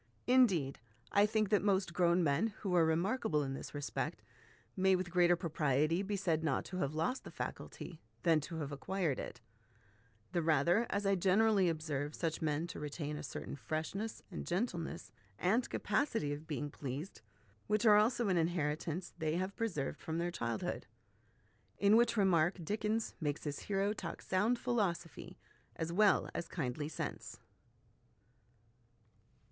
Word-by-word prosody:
Indeed, 195 - +4 0.3
I 205 +1 +5
think 215 -1 +1
that 210 -1 +4
most 190 -3 +1
grown 175 0 +3
men 145 +8 +2
'who 190 -3 -1
are 170 - +6
remarkable 165 - +1
in 135 -1 -3
this 135 - -7
respect 145 -1 -3 0.5
may 190 0 +4
with 180 -1 -3
greater 175 -1 +5
propriety 155 -1 +1
be 200 +1 -2
said 170 -5 0
not 140 -5 0
to 185 - -6
have 150 -4 -1
lost 170 +12 -1
the - - -8
faculty, 165 -3 -6 0.2
than 165 -2 +5
to 165 +3 -6
have 145 -1 -4
acquired 155 +1 -1
it; - - -7 0.9
the 175 - +1
rather, 165 - +3
as 200 0 -1
I 195 - +4
generally 195 +1 +4
observe 155 -2 -2
such 165 -2 -2
men 155 0 0
to 175 - -7
retain 150 0 -4
a - - -5
certain - - -6
freshness, 160 +9 -4
and 170 - -6
gentleness, 175 -4 -2 0.3
and 225 - +1
capacity 210 - 0
of 150 +2 -8
being 145 -2 -3
pleased, 145 +7 -6 0.5
which 215 +2 +1
are 210 -2 +8
also 230 +2 +3
an 185 -2 +2
inheritance 165 +1 -1
they 155 0 0
have 185 +3 -2
preserved 185 -12 -2
from 160 0 -3
their 175 +1 -1
child 115 -8 -3
hood"; - - -3 0.9
in 200 +1 +5
which 235 0 +4
remark 180 -3 +3
Dickens 215 +3 -1
makes 145 -1 -2
his 145 -2 -3
hero 200 +1 0
talk 175 -5 -6
sound 210 +6 +2
philosophy 205 -10 -2 0.4
as 165 +1 -3
well 210 +2 +4
as 170 - -3
kindly 145 -1 -3
sense. - - -5
175 Hz, 155 wpm, -35 LUFS, 155-200 Hz, 0.9 s, are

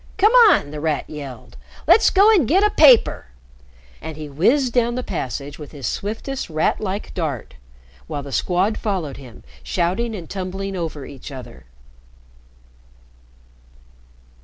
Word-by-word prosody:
"Come 425 +3 +5 0.2
on!" 145 - +2
The 150 - -6
Rat 155 -1 -1
yelled. 140 -4 -9 0.3
"Let's 445 - +6
go 405 +3 +5
and 355 - +3
get 380 - +3
a 420 - +3
paper!" 260 - +5 0.7
And 160 -1 -7
he 155 -1 -7
whizzed 235 - +2
down 240 -1 +1
the 255 - -3
passage 145 - -5
with 150 0 -10
his 140 -4 -7
swiftest 225 +6 -4
rat 155 0 0
like 200 0 -4
dart, 150 - -4 0.5
while 145 - -5
the 140 - -9
Squad 185 +8 0
followed 180 - -3
him, 125 -5 -13 0.2
shouting 180 - -1
and 175 -5 -8
tumbling 195 +1 -5
over 160 -5 -5
each 140 +1 -10
other. 125 - -11
180 Hz, 140 wpm, -21 LUFS, 145-235 Hz, 0.7 s, Let's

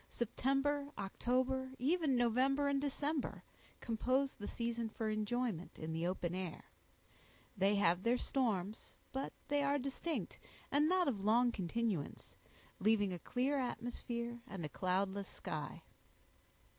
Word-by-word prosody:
September, 275 +4 +1
October, 260 +6 0
even 300 +1 +2
November 260 +4 +3
and 280 -1 +2
December, 290 +1 -1 0.4
compose 255 +4 +1
the 205 - -7
season 235 -1 -2
for 220 0 -2
enjoyment 215 -3 -1
in 160 0 -4
the 165 +2 0
open 180 -2 -1
air; 185 -2 -4 0.9
they 195 +1 +3
have 180 -3 +4
their 235 +4 +3
storms, 215 -7 -1 0.2
but 270 +1 -2 0.2
they 290 0 +2
are 285 0 +3
distinct, 275 +4 -3 0.3
and 295 +2 +4
not 370 -2 +4
of 210 -8 0
long 235 +4 +5
continuance, 200 -4 -2 0.5
leaving 205 -2 +3
a 175 - -4
clear 270 +7 0
atmosphere 240 -1 -3
and 190 -8 -4
a - - -4
cloudless 190 +3 0
sky. - - -5
235 Hz, 130 wpm, -37 LUFS, 200-270 Hz, 0.9 s, long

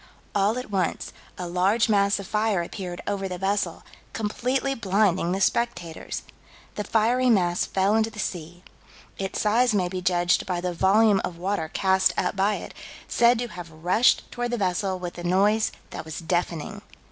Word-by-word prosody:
"All 205 +3 +2
at 250 -4 -6
once, 185 -4 -1 0.2
a 180 - -4
large 190 +7 +2
mass 200 -2 +3
of 200 - -6
fire 210 -3 0
appeared 180 0 -6
over 195 -1 -2
the 180 - -4
vessel, 195 +2 -1 0.3
completely 250 +5 -1
blinding 195 -6 +1
the 190 - -1
spectators." 195 -6 -1 0.5
The 210 - -3
fiery 235 +5 +2
mass 175 -6 +2
fell 195 +2 +1
into 220 0 +2
the 225 - -15
sea. 175 -3 -5 0.6
Its 195 0 -3
size 225 +2 +3
may 180 -3 +1
be 185 0 -4
judged 175 +1 +2
by 180 -2 -1
the 180 0 -2
volume 200 +3 +4
of 175 - -4
water 185 -2 -2
cast 190 -1 +2
up 180 - 0
by 200 +2 +2
it, - - -8 0.3
said 240 0 +4
to 240 +1 -2
have 175 -3 -8
rushed 175 +9 +2
toward 245 0 -3
the 240 - -1
vessel 190 -1 0
with 175 -1 -6
a - - -6
noise 200 +5 +2 0.2
that - - -6
was 160 -1 -7
"deafening." 170 -2 -2
195 Hz, 175 wpm, -25 LUFS, 180-215 Hz, 0.6 s, volume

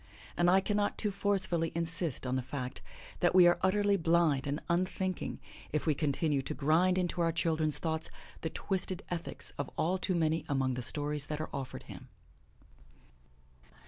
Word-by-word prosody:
And 175 0 +3
I 190 +2 +5
cannot 205 +1 0
too 210 - -1
forcefully 190 -4 0
insist 165 -4 -2
on 125 0 -1
the 130 - 0
fact 130 0 -5 0.4
that 175 +1 +2
we 180 -1 +8
are 175 0 +5
utterly 200 +1 +3
blind 165 -5 +2
and 145 +2 -1
unthinking 185 +1 -1 0.3
if 150 - -1
we 155 - +3
continue 145 0 0
to 150 +3 -4
grind 170 +6 +3
into 175 -1 0
our 165 -1 +3
children's 155 -2 +2
thoughts 160 -1 -2 0.3
the 160 - -2
twisted 185 +1 -2
ethics 170 -1 -1
of 145 - -2
all 180 +4 +1
too 185 0 0
many 160 -1 +1
among 135 -2 +1
the 125 - -3
stories 145 +3 -1
that 150 -1 -3
are 155 - -4
offered 130 -2 -5
him. - - -11
165 Hz, 170 wpm, -32 LUFS, 150-185 Hz, 0.4 s, we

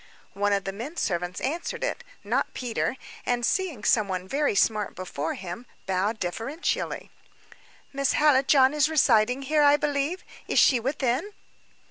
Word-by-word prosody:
One 205 +1 0
of 200 -1 +1
the 195 - -4
men 260 - -7
servants 180 -1 -2
answered 320 +6 -3
it, - - -2 0.2
not - - -1
Peter; 250 +1 -2 0.3
and, 240 -1 0
seeing 325 - -1
somebody 195 -7 +1
very 280 +2 0
smart 210 0 +1
before 160 -4 -4
him, 190 +6 -8 0.2
bowed 195 +4 -1
deferentially. 230 - -3 0.8
"Miss 275 0 +1
Hallijohn 270 -2 +4
is 300 0 +2
residing 250 -4 +3
here, 300 +3 +2
I 290 0 +6
believe. 295 +4 -1 0.2
Is - - -1
she 255 - +6
within?" 265 - -1
250 Hz, 140 wpm, -26 LUFS, 200-290 Hz, 0.8 s, I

